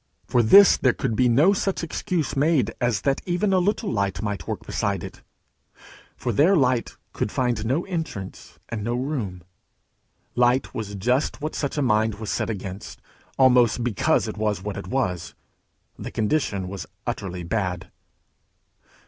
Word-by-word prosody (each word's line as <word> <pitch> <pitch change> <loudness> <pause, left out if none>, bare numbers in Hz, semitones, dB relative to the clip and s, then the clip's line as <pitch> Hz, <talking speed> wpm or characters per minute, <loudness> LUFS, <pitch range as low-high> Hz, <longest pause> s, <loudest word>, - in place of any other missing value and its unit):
For 120 - +2
this 195 - +8
there 130 -3 +3
could 110 - -2
be 125 +2 +3
no 150 +12 +5
such 195 -2 -1
excuse 165 -3 -2
made 140 -4 +2
as 120 -4 +1
that 135 -1 0
even 185 +3 +1
a 185 - +4
little 200 +4 0
light 100 -3 -1
might 100 -7 -4
work - - -4
beside - - -2
it; - - -9 1.0
for - - -2
there 170 +8 +4
light 125 -6 +1 0.2
could 105 - -2
find 120 -5 0
no 135 +10 0
entrance 160 - -6
and 115 -3 -4
no 120 +2 -1
room; 120 - -3 0.9
light 125 +2 +2
was 105 -2 -5
just 125 +11 0
what 155 +1 -4
such 140 0 -3
a 145 - +1
mind 110 -3 +2
was 110 0 -5
set - - -1
against, 100 -1 -6 0.4
almost 125 -3 +4
because 115 -4 +1
it - - -6
was 105 -3 -1
what 105 0 -4
it 100 - -7
was. 90 -10 -2 0.6
The - - -5
condition 105 -5 -1
was 90 -6 -6 0.2
utterly 90 -2 -4
bad. 90 -1 -3
120 Hz, 160 wpm, -24 LUFS, 100-140 Hz, 1.0 s, this